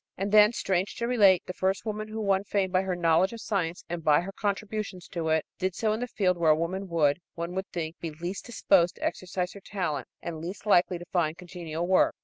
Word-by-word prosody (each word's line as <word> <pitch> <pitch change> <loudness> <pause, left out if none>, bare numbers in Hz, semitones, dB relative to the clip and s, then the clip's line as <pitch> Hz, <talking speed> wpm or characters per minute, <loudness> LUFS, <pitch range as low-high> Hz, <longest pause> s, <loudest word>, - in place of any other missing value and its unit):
And 195 +2 -2
then, 210 0 +7
strange 190 -4 -1
to 235 - -2
relate, 200 -7 +5
the 185 - -5
first 190 +3 -1
woman 215 0 -3
who 220 +1 -6
won 195 -2 +2
fame 195 -2 0
by 185 0 +3
her 190 -1 -2
knowledge 175 +3 +3
of 230 - -7
science 180 -6 -2
and 170 -1 -4
by 150 +1 +5
her 190 +3 -6
contributions 205 -2 -3
to 170 -4 -2
it, 160 0 +2
did 185 -1 -1
so 215 -2 +1
in 220 - -2
the 245 - -2
field 180 -6 0
where 165 -2 +3
a 155 - +7
woman 185 +5 -3
would, 160 -3 +2 0.2
one 170 +1 -4
would 190 +1 -3
think, 165 -1 -4
be 165 - -4
least 175 +8 -6
disposed 190 -6 +3
to - - -10
exercise 180 0 -2
her 200 - -11
talent 180 -7 -3
and 160 -2 -6
least 185 +5 -7
likely 180 -3 +4
to 175 - -10
find 165 -3 +1
congenial 175 -2 -5
work. 185 +1 +3
185 Hz, 235 wpm, -28 LUFS, 170-200 Hz, 0.2 s, then